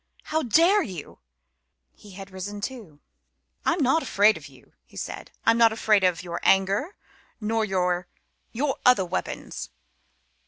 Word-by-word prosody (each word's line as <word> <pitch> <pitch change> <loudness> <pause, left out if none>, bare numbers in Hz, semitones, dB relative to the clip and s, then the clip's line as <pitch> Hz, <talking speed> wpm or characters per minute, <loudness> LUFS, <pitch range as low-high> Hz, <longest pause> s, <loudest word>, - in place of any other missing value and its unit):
How 315 +1 -1
dare 335 - +4
you!" 180 - -7 0.7
He 205 -2 -15
had 195 +1 -10
risen 200 +2 -6
too. 205 - -7 0.7
"I'm 330 -2 +2
not 270 +6 +3
afraid 210 -3 +4
of 150 -2 -10
you," 130 -3 -20
he - - -17
said. - - -6 0.2
"I'm 230 +1 +4
not 230 -1 +6
afraid 215 -2 +2
of 180 -1 +1
your 170 -1 -5
anger, 195 - +2 0.4
nor 225 +1 0
of - - -9
your 180 -1 0 0.4
your 270 +3 -1
other 250 -7 +5
weapons. 180 +1 -5
205 Hz, 150 wpm, -25 LUFS, 185-250 Hz, 0.7 s, not